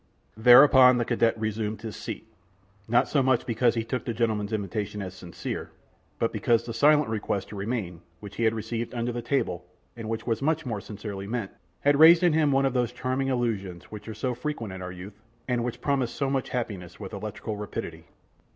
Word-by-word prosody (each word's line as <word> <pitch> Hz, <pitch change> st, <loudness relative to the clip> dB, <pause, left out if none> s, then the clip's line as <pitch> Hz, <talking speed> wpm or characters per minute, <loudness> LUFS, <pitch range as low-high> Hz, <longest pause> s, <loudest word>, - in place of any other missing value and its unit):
Thereupon 125 Hz, +2 st, +8 dB
the 120 Hz, -, 0 dB
cadet 115 Hz, -1 st, +1 dB
resumed 110 Hz, 0 st, -3 dB
his 110 Hz, -4 st, -5 dB
seat, -, -, -7 dB, 0.6 s
not 120 Hz, +2 st, +3 dB
so 145 Hz, -, +2 dB
much 130 Hz, -2 st, +2 dB
because 120 Hz, 0 st, +2 dB
he 115 Hz, -, 0 dB
took 120 Hz, +2 st, -3 dB
the 115 Hz, -, -3 dB
gentleman's 110 Hz, -2 st, 0 dB
invitation 105 Hz, -1 st, -3 dB
as 95 Hz, -3 st, -5 dB
sincere, 90 Hz, -2 st, -6 dB, 0.5 s
but -, -, 0 dB
because 115 Hz, -1 st, +2 dB
the 115 Hz, -, -5 dB
silent 150 Hz, +5 st, +4 dB
request 105 Hz, -3 st, -2 dB
to -, -, -8 dB
remain, 100 Hz, -5 st, -3 dB, 0.2 s
which 100 Hz, -1 st, -10 dB
he 115 Hz, -, +1 dB
had 110 Hz, 0 st, +2 dB
received 115 Hz, +2 st, -4 dB
under 120 Hz, +1 st, -1 dB
the 120 Hz, 0 st, -4 dB
table, 120 Hz, -9 st, -1 dB, 0.3 s
and 115 Hz, -2 st, -6 dB
which 115 Hz, 0 st, -3 dB
was 115 Hz, 0 st, -1 dB
much 160 Hz, +2 st, 0 dB
more 110 Hz, -5 st, -3 dB
sincerely 100 Hz, -2 st, -7 dB
meant, 110 Hz, -3 st, -3 dB, 0.3 s
had 145 Hz, 0 st, +3 dB
raised 165 Hz, +2 st, +8 dB
in 175 Hz, -3 st, +4 dB
him 155 Hz, -2 st, +3 dB
one 135 Hz, 0 st, +3 dB
of 135 Hz, -, +1 dB
those 120 Hz, -2 st, +1 dB
charming 130 Hz, +2 st, -2 dB
illusions, 105 Hz, -9 st, -2 dB
which 105 Hz, 0 st, -9 dB
are 110 Hz, -, -6 dB
so 125 Hz, +4 st, -2 dB
frequent 120 Hz, -5 st, -4 dB
in 95 Hz, -, -7 dB
our 90 Hz, 0 st, -5 dB
youth, 95 Hz, +3 st, -10 dB, 0.3 s
and 120 Hz, -2 st, 0 dB
which 120 Hz, -1 st, -4 dB
promised 135 Hz, -4 st, 0 dB
so 135 Hz, -2 st, -1 dB
much 135 Hz, -2 st, -1 dB
happiness, 95 Hz, -8 st, -4 dB
with 95 Hz, -3 st, -8 dB
electrical 105 Hz, +1 st, -5 dB
rapidity. 105 Hz, 0 st, -6 dB
115 Hz, 205 wpm, -27 LUFS, 105-125 Hz, 0.6 s, Thereupon